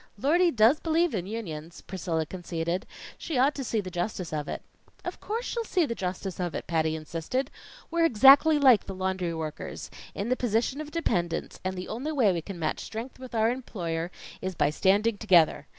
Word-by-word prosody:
"Lordy 340 - +3
does 240 +2 +4
believe 330 -1 +1
in 185 -3 -2
Unions," 170 -7 -6
Priscilla 170 -4 -2
conceded. 170 0 -3 0.3
"She 315 - -3
ought 270 +4 +4
to 275 - -4
see 225 -3 0
the 185 -2 -7
justice 175 -1 -3
of 150 -1 -2
it." - - -5 0.4
"Of - - -5
course 455 +3 -3
she'll 470 - -2
see 365 -6 +1
the 235 - -2
justice 190 -2 -4
of 175 -2 -2
it," - - -4
Patty 160 -1 +1
insisted. 165 - -3 0.4
"We're 335 0 +3
exactly 275 +4 +7
like 260 -6 +6
the 195 - -5
laundry 185 -2 -1
workers 155 -2 -6 0.2
in 205 +4 -2
the 255 - +3
position 245 +4 0
of 300 - -7
dependents, 175 - -1
and 185 0 -2
the 180 - -5
only 265 +8 -3
way 230 -10 +4
we 170 - -2
can 195 +3 -8
match 160 -2 -1
strength 230 +4 -7
with 255 -2 -8
our 225 +1 +3
employer, 175 -10 -3 0.3
is 185 -1 -3
by 145 - +2
standing 205 +6 +2
together. 175 -7 +4
200 Hz, 195 wpm, -28 LUFS, 175-260 Hz, 0.4 s, exactly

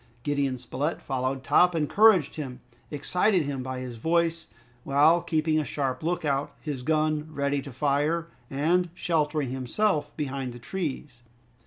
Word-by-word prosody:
Gideon 140 -3 0
Spilett 140 +5 -3
followed 130 0 -2
Top, 180 +4 +4
encouraged 180 +1 +4
him, 135 -5 -6 0.3
excited 180 +5 +1
him 140 -2 -3
by 130 0 -4
his 125 -3 -7
voice, 165 +3 0 0.3
while 150 +5 +4
keeping 155 -1 +1
a - - 0
sharp 135 -3 -2
look 175 +1 -1
out, 140 0 -1
his 145 -5 -5
gun 155 +2 +1
ready 140 -1 0
to 140 - -9
fire, 150 +5 0 0.2
and 170 +6 +1
sheltering 150 -5 0
himself 145 - -1
behind 135 -4 -3
the - - -9
trees. 145 -4 -5
150 Hz, 145 wpm, -27 LUFS, 135-165 Hz, 0.3 s, Top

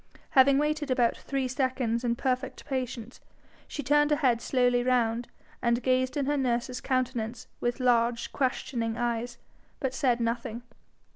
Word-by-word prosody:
Having 270 +1 +6
waited 300 0 0
about 245 -2 +2
three 270 -2 -2
seconds 255 -3 -1
in 235 -1 +1
perfect 255 +1 -2
patience, 255 -3 -4 0.5
she 290 - -5
turned 295 +2 +3
her 295 - +3
head 250 -5 +2
slowly 245 -2 +2
round, 240 -2 +1 0.3
and 235 0 +1
gazed 255 +1 +1
in 280 - 0
her 290 +1 +1
nurse's 250 -1 -1
countenance 245 -3 -2
with 240 +2 -1
large 235 -2 +2
questioning 240 -4 -1
eyes, 240 0 -2 0.4
but 265 -3 -2
said 260 -4 +1
nothing. 235 0 -2
250 Hz, 145 wpm, -28 LUFS, 235-265 Hz, 0.5 s, Having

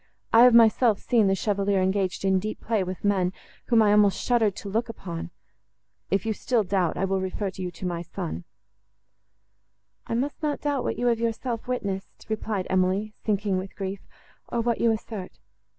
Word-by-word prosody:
I 225 - +8
have 250 -2 +6
myself 225 -1 +5
seen 230 -4 +2
the 195 - +3
Chevalier 200 -1 0
engaged 190 0 0
in 190 -1 +3
deep 215 +3 -4
play 220 -4 0
with 185 0 -6
men, 190 -3 +1 0.3
whom 230 -2 +4
I 205 - +4
almost 205 -1 +4
shuddered 225 -5 +2
to - - -8
look 225 +4 -1
upon. 175 -6 -6 0.8
If 195 +1 0
you 220 - 0
still 230 +1 0
doubt, 185 -3 0
I 195 - +1
will 190 0 0
refer 190 +1 -3
you 185 -1 -4
to 180 - -8
my 175 -1 -2
son." 85 - -5 1.6
"I - - -1
must 275 +7 -2
not 300 -2 -1
doubt 285 -3 0
what - - -2
you 245 - -1
have 235 -2 +2
yourself 230 +1 -2
witnessed," 200 -6 -4
replied 215 -3 -2
Emily, 190 +3 +1
sinking 200 -3 0
with 190 +1 -8
grief, 195 0 -4 0.5
"or 240 - 0
what 235 0 0
you 235 - +4
assert. 215 -3 -5
205 Hz, 180 wpm, -26 LUFS, 190-230 Hz, 1.6 s, I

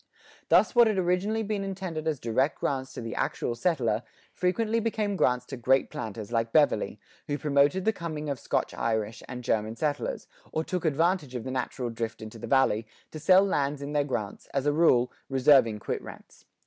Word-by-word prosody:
Thus - - +5
what 240 -2 +6
had 215 -2 0
originally 190 +5 +1
been 205 -1 -2
intended 185 -5 -4
as 155 -4 0
direct 130 +5 0
grants 135 -1 -2
to - - -6
the 115 -1 -5
actual - - -1
settler, 120 -6 0 0.3
frequently 215 +5 0
became 215 -2 -1
grants 125 -8 +2
to 135 - -7
great 130 +3 +2
planters 110 -7 -6
like 115 -1 0
Beverley, 150 +1 +2 0.3
who 145 - -1
promoted 145 +5 +2
the 220 - +3
coming 155 -5 -5
of 140 -3 -3
Scotch - - -1
Irish 110 -1 -2
and 125 -1 -6
German 110 -1 0
settlers, 145 +2 -2 0.3
or 160 - -1
took 180 0 -3
advantage 160 -2 +1
of 120 - -3
the 130 - -5
natural 125 -1 -3
drift 115 0 -4
into 110 +1 -9
the - - -6
Valley, 115 -5 +2 0.2
to 155 - -7
sell 185 +5 +6
lands 145 -6 0
in 140 +1 -5
their 145 -1 +2
grants, 110 -8 -4
as 140 0 0
a 145 - +3
rule, 125 -6 +4 0.2
reserving 130 -4 +5
quit 105 - -4
rents. - - -13
140 Hz, 190 wpm, -28 LUFS, 120-175 Hz, 0.3 s, what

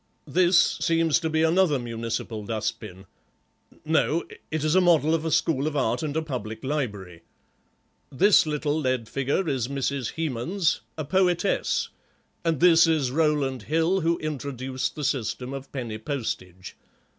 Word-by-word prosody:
This 180 0 +3
seems 165 -1 +2
to 160 -1 -2
be 160 0 +1
another 165 -2 +3
municipal 115 -2 -4
dust 110 +1 -3
bin—no, 115 - -4 0.3
it 155 -1 -2
is 155 0 +1
a 185 - +5
model 165 -3 +4
of 165 -1 0
a - - 0
school 150 -2 +1
of 150 -1 -2
art 120 -3 0
and 155 +1 -2
public 110 -6 -5
library. 105 - -4 0.9
This 190 +5 +5
little 150 -1 -1
lead 130 -4 -1
figure 140 - -1
is 130 -5 -1
Mrs. 135 -2 -2
Hemans, 160 +4 -1 0.2
a 155 - -3
poetess, 185 +3 +1 0.5
and 165 -4 0
this 170 -1 +6
is 150 -6 +1
Rowland 145 -4 +1
Hill, 165 +4 +2
who 170 0 +1
introduced 135 -3 -4
the 150 - -5
system 130 -1 -2
of 135 0 -8
penny 115 -5 -5
postage. 95 -8 -5
145 Hz, 145 wpm, -25 LUFS, 125-160 Hz, 0.9 s, this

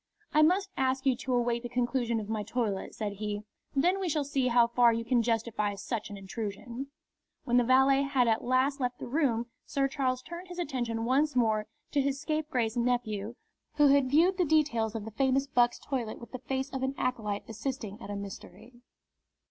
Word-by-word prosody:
"I 305 - +5
must 380 +5 +3
ask 265 0 0
you 265 -2 +4
to 255 0 -1
await 240 -1 +1
the 240 - -6
conclusion 240 -1 0
of 210 - -6
my 215 -1 -2
toilet," 210 -2 -2
said 205 -2 -4
he. 210 0 -3 0.3
"Then 355 +8 +3
we 375 -2 -1
shall 300 -1 +1
see 270 -2 0
how 240 -1 +5
far 235 0 +4
you 230 0 -2
can 245 -1 +3
justify 225 -3 0
such 215 +2 -4
an 205 - -7
intrusion." 225 +6 -5 0.6
When 245 0 +2
the 245 - +5
valet 265 +2 +5
had 275 -3 +2
at 225 -1 +2
last 260 +3 +2
left 245 -1 -1
the - - -6
room 245 -4 +1 0.2
Sir 275 -1 +1
Charles 260 -2 -1
turned 345 +3 -8
his 355 -1 -9
attention 240 -8 -2
once 280 +4 +2
more 220 -3 +2 0.2
to 285 - +2
his 275 0 -1
scapegrace 295 -8 -1
nephew, 235 -3 -1 0.4
who 295 -1 +5
had 275 -2 +4
viewed 350 +7 +4
the - - +5
details 275 -9 +2
of 215 -2 -4
the 220 - -7
famous 270 +3 +2
buck's 245 -3 +2
toilet 245 -6 -3
with 235 - -11
the 255 - -6
face 265 +2 -3
of 265 - -4
an 265 +1 -1
acolyte 215 -5 -2
assisting 225 -2 -5
at - - -8
a 205 - -3
mystery. 215 +4 -9
245 Hz, 200 wpm, -30 LUFS, 225-275 Hz, 0.6 s, I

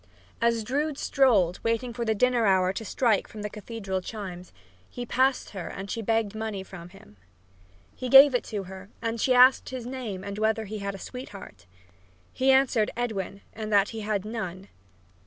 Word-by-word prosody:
As 230 -1 +2
Drood 285 +5 -1
strolled, 210 - +2
waiting 230 +1 -1
for 235 0 -3
the 220 -1 +1
dinner 245 0 +2
hour 185 -1 +3
to 225 - -5
strike 220 -1 +1
from 210 -1 -9
the 210 - -4
cathedral 210 -3 -5
chimes, 185 -3 -7 0.4
he 245 - -6
passed 260 +2 +1
her 190 -4 -6
and 195 +1 -7
she 230 - -3
begged 225 -1 0
money 220 -3 -4
from 180 -3 -11
him. 175 - -17 0.8
He 255 - -5
gave 270 +2 +9
it 245 - +1
to 205 -3 -4
her 190 +1 -10
and 230 -1 -3
she 255 - +3
asked 255 +1 +6
him 260 - -4
his 240 - -8
name 240 -7 -5
and 200 +1 -6
whether 220 0 +1
he 215 +1 -6
had 200 0 -4
a - - -7
sweetheart. 195 - -10 0.7
He 260 +1 +1
answered 265 -5 +4
Edwin, 200 -5 -3
and 215 -1 -6
that 200 -1 +4
he 225 - -6
had 210 -2 -2
none. 200 -4 -6
220 Hz, 190 wpm, -27 LUFS, 195-245 Hz, 0.8 s, gave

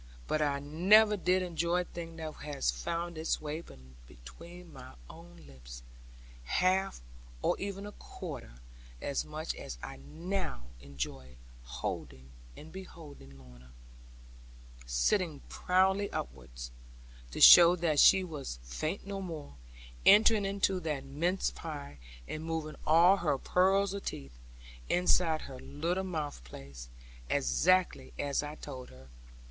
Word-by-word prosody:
But 155 - 0
I 145 -2 +1
never 190 +10 +5
did 185 -1 +1
enjoy 175 0 0
a - - -3
thing, 165 -1 -8
that 160 -1 -6
had 150 -1 -7
found 165 - -2
its 160 - 0
way 155 +2 -5 0.4
between 165 - -13
my 125 - -12
own 175 +1 -14
lips, - - -12 0.6
half, 185 - +1 0.4
or - - +2
even 200 0 -5
a 205 - -7
quarter - - -9 0.5
as 140 - -2
much 155 +1 -5
as 60 - -8
I 65 - -7
now 165 - -4 0.2
enjoyed 65 -1 -7 0.3
beholding 65 - -9
Lorna, 65 -1 -16 1.1
sitting 155 - +1
proudly 190 +2 +1
upwards - - -7 0.6
(to - - -7
show 175 0 +10
that 165 -4 +1
she 190 - +7
was 150 - -6
faint 155 - -4
no 195 0 -5
more) 160 - -7 0.5
entering 210 +1 +6
into 195 -1 0
that 150 -5 -3
mince 170 +7 -1
pie, 145 - -8 0.3
and 155 - -5
moving 160 -1 -4
all 170 +5 +6
her 150 -7 0
pearls 195 +6 +2
of 200 - -5
teeth 70 -3 -7 0.5
(inside 175 -2 +2
her 130 -2 -9
little 170 +8 -2
mouth 155 - -4
place) 60 -1 -11 0.4
exactly 65 - +2
as 140 -1 0
I 150 +1 -6
told 130 -4 -9
her. 65 +1 -15
155 Hz, 125 wpm, -31 LUFS, -, 1.1 s, show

